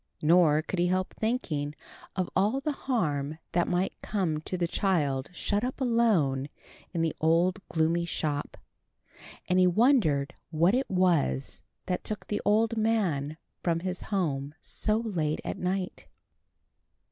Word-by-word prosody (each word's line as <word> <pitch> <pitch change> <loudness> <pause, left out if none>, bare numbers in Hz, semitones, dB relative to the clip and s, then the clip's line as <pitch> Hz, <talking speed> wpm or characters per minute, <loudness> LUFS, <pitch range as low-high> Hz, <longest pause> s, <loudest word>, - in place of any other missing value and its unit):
Nor 155 -1 +5
could 180 - -3
he 175 - +3
help 185 +1 0
thinking 155 - -2 0.4
of 185 -2 0
all 210 +8 +2
the 300 +2 -1
harm 155 - -1
that 175 0 +1
might 180 +2 0
come 180 -7 -1
to 185 - -4
the 175 -1 0
child 145 -8 0
shut 205 +4 -1
up 255 +3 -3
alone 205 - +2 0.4
in 165 -2 -1
the 160 - 0
old 170 +4 +3
gloomy 165 +1 +1
shop; 150 -3 -2 0.9
and 180 0 +3
he 185 - +6
wondered 180 - +3 0.2
what 170 +4 +3
it 260 +2 0
was 170 - +1 0.2
that 180 -1 -2
took 215 -2 -2
the 205 - -2
old 220 +2 +3
man 180 -10 0 0.2
from 165 -1 0
his 185 0 -3
home 150 -8 -1
so 215 0 -1
late 175 -10 -1
at - - -4
night. 185 +1 -3
180 Hz, 145 wpm, -28 LUFS, 155-205 Hz, 0.9 s, he